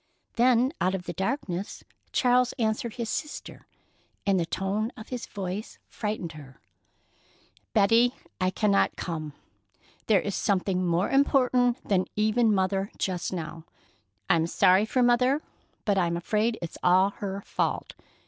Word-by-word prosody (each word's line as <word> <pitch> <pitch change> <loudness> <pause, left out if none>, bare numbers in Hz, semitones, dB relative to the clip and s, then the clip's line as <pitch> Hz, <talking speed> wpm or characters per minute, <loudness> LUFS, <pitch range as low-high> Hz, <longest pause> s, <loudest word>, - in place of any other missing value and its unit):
Then, 250 +3 +3
out 185 +1 +2
of 185 - -5
the 175 - -5
darkness, 190 - -3 0.3
Charles 250 0 +3
answered 220 -1 -1
his 235 -2 -3
sister, 300 +6 -5 0.6
and 195 -2 +3
the 165 - -1
tone 200 +6 -1
of 220 - -10
his 250 -2 -5
voice 195 +2 -5
frightened 210 -6 -4
her: 140 -4 -13 1.1
"Betty, 230 +4 +4 0.2
I 185 0 +2
cannot 200 +1 +2
come. 155 -4 -5 0.7
There 210 -3 +5
is 200 +2 -3
something 190 -2 0
more 175 +1 +1
important 255 -3 +2
than 185 -2 +2
even 215 +2 +3
Mother 195 0 +1
just 180 -3 -2
now. 165 -2 -6 0.6
I'm 165 -1 +3
sorry 185 +4 +4
for 255 +2 +2
Mother, 250 +4 +3 0.5
but 200 -2 +2
I'm 170 -1 +1
afraid 215 +6 0
it's 170 - -7
all 185 +2 +4
her 200 -1 -4
fault. - - -2
200 Hz, 140 wpm, -27 LUFS, 185-235 Hz, 1.1 s, There